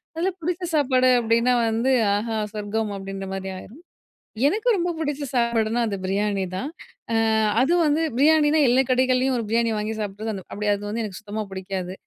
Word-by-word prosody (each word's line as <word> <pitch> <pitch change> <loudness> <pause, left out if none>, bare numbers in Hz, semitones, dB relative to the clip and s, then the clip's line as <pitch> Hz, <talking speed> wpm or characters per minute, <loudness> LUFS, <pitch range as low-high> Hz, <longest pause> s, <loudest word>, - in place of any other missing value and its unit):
அதில 355 +4 0
பிடிச்ச 350 +2 -2
சாப்பாடு 255 -3 +3
அப்டீன்னா, 235 +2 +2 0.2
வந்து 230 +4 +1 0.2
ஆஹா! 220 +2 -2 0.2
சொர்க்கம் 210 +1 -2
அப்டீன்ற 195 0 -6
மாதிரி 190 0 -5
ஆயிரும். 240 - -12 0.7
எனக்கு 430 +8 -1
ரொம்ப 350 0 -1
பிடிச்ச 295 -2 -2
சாப்பாடுனா, 235 -1 +1
அது 200 - -2
பிரியாணி 200 0 0
தான். 275 +10 -4 0.4
ஆ - - +3 0.5
அது 290 - +2
வந்து 300 +1 +2 0.2
பிரியாணினா 305 +1 +4
எல்லா 260 +2 +4
கடைகள்லயும் 255 0 +2
ஒரு 230 - -2
பிரியாணி 230 0 +2
வாங்கி 215 +1 -3
சாப்பிட்றது 205 -1 -5
அப்படி 210 0 -3
அது 200 - -6
வந்து 225 +2 -2
எனக்கு 200 -2 -7
சுத்தமா 215 0 -5
பிடிக்காது. 190 -1 -4
230 Hz, 165 wpm, -23 LUFS, 205-270 Hz, 0.7 s, பிரியாணினா